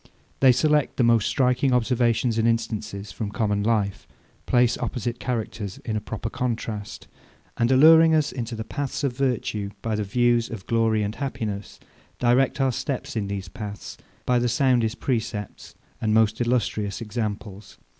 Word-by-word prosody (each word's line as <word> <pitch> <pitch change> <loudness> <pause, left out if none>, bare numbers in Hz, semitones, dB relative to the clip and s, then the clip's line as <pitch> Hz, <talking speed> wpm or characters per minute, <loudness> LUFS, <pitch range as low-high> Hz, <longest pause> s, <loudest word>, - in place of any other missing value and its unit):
They 135 -1 +7
select 150 +3 +2
the 125 - +3
most 115 -3 +4
striking 130 0 +2
observations 120 -1 +1
and 110 - +2
instances 110 -3 -2
from 100 +3 -4
common 105 -2 0
life; 100 -2 0 0.4
place 125 -1 +3
opposite 120 -2 -3
characters 110 -5 -4
in 110 - -2
a 105 - -1
proper 110 +1 -5
contrast; 110 -4 -4 0.5
and 120 +1 +2
alluring 160 +4 +7
us 150 -1 +1
into 120 -2 -4
the 110 - -4
paths 145 +4 -4
of 135 -4 0
virtue 120 -6 -1
by 115 - -1
the 105 0 0
views 120 +3 +2
of 105 -5 -7
glory 115 -2 +1
and 105 +1 -2
happiness, 110 -7 -5 0.4
direct 125 +4 +2
our 135 -1 +2
steps 130 +1 -4
in 105 -3 -1
these 100 -1 -4
paths 105 +2 -7 0.3
by 125 -1 +3
the 120 0 +1
soundest 125 -2 +1
precepts 110 -5 -3 0.3
and 110 -1 +1
most 110 +1 +3
illustrious 110 -4 0
examples. 105 -3 -5
115 Hz, 155 wpm, -24 LUFS, 105-125 Hz, 0.5 s, They